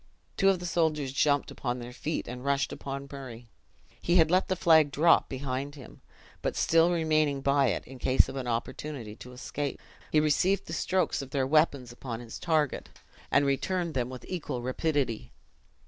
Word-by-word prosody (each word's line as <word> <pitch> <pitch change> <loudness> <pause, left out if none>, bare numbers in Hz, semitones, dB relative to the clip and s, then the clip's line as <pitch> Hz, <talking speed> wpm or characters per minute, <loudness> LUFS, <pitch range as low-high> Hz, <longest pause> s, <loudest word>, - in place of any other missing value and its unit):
Two 195 - +4
of 195 - +3
the 180 - -7
soldiers 155 -5 0
jumped 145 0 +2
upon 125 -1 -3
their 120 0 -8
feet, 155 +5 -3
and 125 +1 -7
rushed 140 0 0
upon 140 0 -6
Murray. 125 -4 -9 0.5
He 175 - +1
had 165 -2 +5
let 185 +1 +3
the 185 - 0
flag 160 -4 +5
drop 155 +4 +4
behind 135 +1 -4
him; 135 -5 -13 0.4
but - - -2
still 165 +1 +4
remaining 155 -4 +1
by 140 0 +3
it, 110 - -1
in 130 0 -11
case 130 +1 +4
of - - -7
an 130 -2 -4
opportunity 115 0 -4
to 125 - -11
escape, 140 +3 -4 0.3
he 155 - +4
received 165 +6 +2
the - - -7
strokes 185 -6 0
of 135 - -8
their 135 -1 0
weapons 140 -4 +2
upon 120 -1 -6
his 120 -2 -9
target, 155 -4 0 0.4
and 145 - +3
returned 170 +5 0
them 125 -2 -1
with 130 -1 -9
equal 150 -9 -4
rapidity. 130 -3 -1
140 Hz, 180 wpm, -29 LUFS, 130-160 Hz, 0.5 s, had